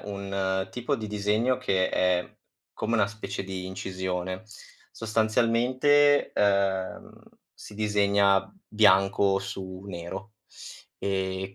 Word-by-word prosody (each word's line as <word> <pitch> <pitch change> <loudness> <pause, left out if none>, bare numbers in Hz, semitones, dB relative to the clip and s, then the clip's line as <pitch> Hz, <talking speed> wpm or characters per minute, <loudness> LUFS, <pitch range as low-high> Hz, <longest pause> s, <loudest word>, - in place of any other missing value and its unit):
un 95 -1 -2
tipo 125 +4 -2
di 110 -3 -5
disegno 105 +5 0
che 95 -7 0
è 90 -1 0 0.4
come 115 +2 -2
una 110 -3 +3
specie 105 0 -6
di 95 -1 -5
incisione. 95 0 -4 0.5
Sostanzialmente, 120 +6 +2
ehm, 100 -2 0 0.4
si - - -12
disegna 100 -2 +2 0.2
bianco 100 -1 +4
su 95 -1 -7
nero 95 +3 -7 0.6
e 95 0 -3
100 Hz, 100 wpm, -27 LUFS, 95-110 Hz, 0.6 s, bianco